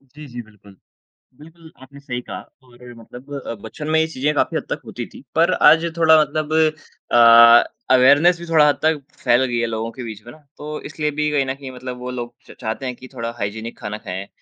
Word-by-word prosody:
जी, 150 Hz, 0 st, -10 dB
जी, 120 Hz, -1 st, -8 dB
बिल्कुल। 100 Hz, -2 st, -19 dB, 0.6 s
बिल्कुल, 165 Hz, +1 st, -16 dB
आपने 140 Hz, +2 st, -14 dB
सही 130 Hz, -4 st, -5 dB
कहा -, -, -8 dB, 0.2 s
और 125 Hz, -1 st, -15 dB
मतलब 125 Hz, +5 st, -12 dB
अ, -, -, -3 dB
बचपन 150 Hz, +7 st, -7 dB
में 160 Hz, -, +3 dB
ये 160 Hz, -, +1 dB
चीज़ें 150 Hz, 0 st, -2 dB
काफ़ी -, -, 0 dB
हद -, -, -4 dB
तक -, -, -4 dB
होती -, -, -7 dB
थीं, -, -, -12 dB
पर -, -, +3 dB, 0.2 s
आज 165 Hz, +1 st, +5 dB
थोड़ा 160 Hz, -1 st, +6 dB
मतलब 155 Hz, +1 st, -2 dB, 0.6 s
अ, 115 Hz, 0 st, +8 dB, 0.3 s
अवेयरनेस 145 Hz, +7 st, +5 dB
भी 170 Hz, -, -8 dB
थोड़ा 160 Hz, -3 st, +4 dB
हद 145 Hz, -, +1 dB
तक 160 Hz, -1 st, +2 dB, 0.2 s
फैल 120 Hz, +2 st, +3 dB
गई 120 Hz, -2 st, -2 dB
है 115 Hz, -, 0 dB
लोगों 115 Hz, +1 st, -4 dB
के 125 Hz, -, -6 dB
बीच 110 Hz, -2 st, -8 dB
में 120 Hz, -, -10 dB
ना। -, -, -16 dB, 0.2 s
तो 150 Hz, +1 st, -8 dB, 0.2 s
इसलिए 150 Hz, -1 st, -3 dB
भी 150 Hz, 0 st, +1 dB
कहीं 140 Hz, -2 st, +1 dB
न 130 Hz, -, -3 dB
कहीं 135 Hz, -1 st, -10 dB
मतलब 125 Hz, 0 st, -8 dB
वो 125 Hz, 0 st, -6 dB
लोग 120 Hz, 0 st, -6 dB
च -, -, -14 dB
चाहते 110 Hz, +3 st, -4 dB
हैं 125 Hz, -1 st, -4 dB
कि 130 Hz, -, -13 dB
थोड़ा 115 Hz, -2 st, -5 dB
हाइजीनिक 110 Hz, +2 st, -5 dB
खाना 105 Hz, -2 st, -5 dB
खाएँ 95 Hz, +2 st, -5 dB
130 Hz, 225 wpm, -20 LUFS, 115-150 Hz, 0.6 s, अ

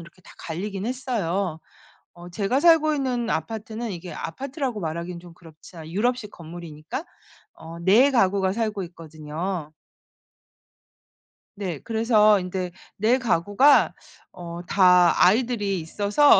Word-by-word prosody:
이렇게 170 Hz, +2 st, -15 dB
다 -, -, -15 dB
갈리긴 195 Hz, +4 st, -5 dB
했어요. 200 Hz, -9 st, -2 dB, 0.5 s
어 175 Hz, 0 st, -12 dB
제가 200 Hz, +8 st, 0 dB
살고 320 Hz, -1 st, +5 dB
있는 250 Hz, -5 st, -1 dB
아파트는 220 Hz, +7 st, -4 dB
이게 175 Hz, -1 st, -7 dB
아파트라고 260 Hz, -, -4 dB
말하긴 170 Hz, +1 st, -4 dB
좀 175 Hz, -1 st, -13 dB
그렇자 165 Hz, -1 st, -13 dB
유럽식 215 Hz, +5 st, -1 dB
건물이니까 170 Hz, -, -8 dB, 0.5 s
어 165 Hz, +1 st, -10 dB
4 210 Hz, +11 st, +5 dB
가구가 195 Hz, -6 st, +2 dB
살고 215 Hz, -3 st, -2 dB
있거든요. 160 Hz, 0 st, -6 dB, 1.8 s
네 185 Hz, -7 st, -4 dB
그래서 220 Hz, -, +3 dB
인제 180 Hz, 0 st, -4 dB, 0.3 s
4 225 Hz, +5 st, +3 dB
가구가 235 Hz, -, +3 dB, 0.4 s
어 170 Hz, -1 st, -8 dB
다 180 Hz, -2 st, +5 dB
아이들이 210 Hz, -2 st, +2 dB
있어서 205 Hz, -, +4 dB
195 Hz, 260 characters per minute, -24 LUFS, 170-230 Hz, 1.8 s, 살고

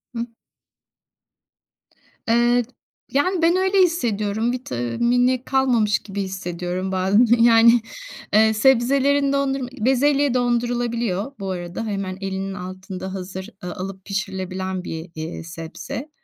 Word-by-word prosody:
Hıı. 230 Hz, -, -2 dB, 2.0 s
Eee, 240 Hz, +1 st, +3 dB, 0.5 s
yani, 345 Hz, +6 st, +1 dB
ben 335 Hz, +2 st, +4 dB
öyle 380 Hz, +1 st, +2 dB
hissediyorum. 225 Hz, -, +1 dB
Vitamini 245 Hz, -, 0 dB
kalmamış 245 Hz, -6 st, +2 dB
gibi 200 Hz, -1 st, -5 dB
hissediyorum 185 Hz, 0 st, -4 dB
bazen, 190 Hz, +5 st, +3 dB, 0.2 s
yani, 230 Hz, 0 st, +6 dB, 0.5 s
eee, 220 Hz, +1 st, +5 dB
sebzelerin 275 Hz, +4 st, +3 dB
dondurma 270 Hz, -2 st, 0 dB
bezelye 275 Hz, +3 st, +3 dB
dondurulabiliyor. 240 Hz, -3 st, 0 dB
Bu 195 Hz, -1 st, -4 dB
arada 175 Hz, +4 st, -5 dB
hemen 195 Hz, -3 st, -3 dB
elinin 195 Hz, 0 st, -3 dB
altında 185 Hz, +1 st, -7 dB
hazır, 190 Hz, +1 st, -6 dB
ııı, 180 Hz, -1 st, -5 dB
alıp 190 Hz, 0 st, -7 dB
pişirilebilen 190 Hz, -1 st, -3 dB
bir -, -, -5 dB
y 160 Hz, +3 st, -7 dB
eee, 160 Hz, +1 st, -5 dB
sebze. 165 Hz, -, -7 dB
215 Hz, 110 wpm, -22 LUFS, 190-250 Hz, 2.0 s, yani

